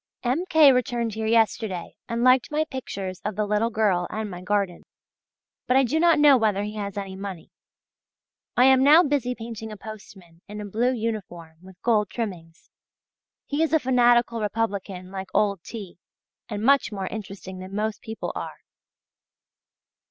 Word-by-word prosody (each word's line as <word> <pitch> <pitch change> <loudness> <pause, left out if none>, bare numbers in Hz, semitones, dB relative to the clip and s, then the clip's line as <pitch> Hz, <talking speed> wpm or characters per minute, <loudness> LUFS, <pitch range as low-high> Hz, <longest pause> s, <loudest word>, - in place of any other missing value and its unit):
M. 265 +9 0
K. 310 -4 +7
returned 240 -3 0
here 220 +1 -3
yesterday, 220 -5 +1 0.2
and 235 0 -1
liked 255 0 +4
my 305 +1 0
pictures 200 - -6
of 210 -1 -3
the 210 +1 0
little 210 +2 +1
girl 205 -6 +1
and 215 -1 -4
my 180 0 -7
garden. 195 -2 -1 0.9
But 255 - +4
I 270 - +5
do 265 +6 0
not 340 0 +5
know 295 -2 +7
whether 210 -3 +1
he 210 +1 -5
has 205 -2 -5
any 195 -1 -5
money. 190 -3 -8 1.1
I 250 - +6
am 265 0 +6
now 305 +5 +7
busy 275 -5 0
painting 225 -1 -7
a 210 - -8
postman 195 -5 -12
in 210 +1 -8
a 210 - -5
blue 230 +5 0
uniform 200 -9 -5
with 185 -1 -15
gold 215 -4 +2
trimmings; 175 -8 -7 0.7
he 290 +2 -2
is 325 -1 +1
a 320 - +5
fanatical 240 -3 +3
Republican 200 -4 -3
like 190 -1 -6
old 200 -4 +2
T., 195 -5 -9 0.5
and 210 -1 -4
much 275 -1 +3
more 195 -2 -4
interesting 195 -3 -7
than 185 +1 -8
most 215 +1 -2
people 220 -1 -5
are. - - -7
215 Hz, 165 wpm, -25 LUFS, 195-245 Hz, 1.1 s, K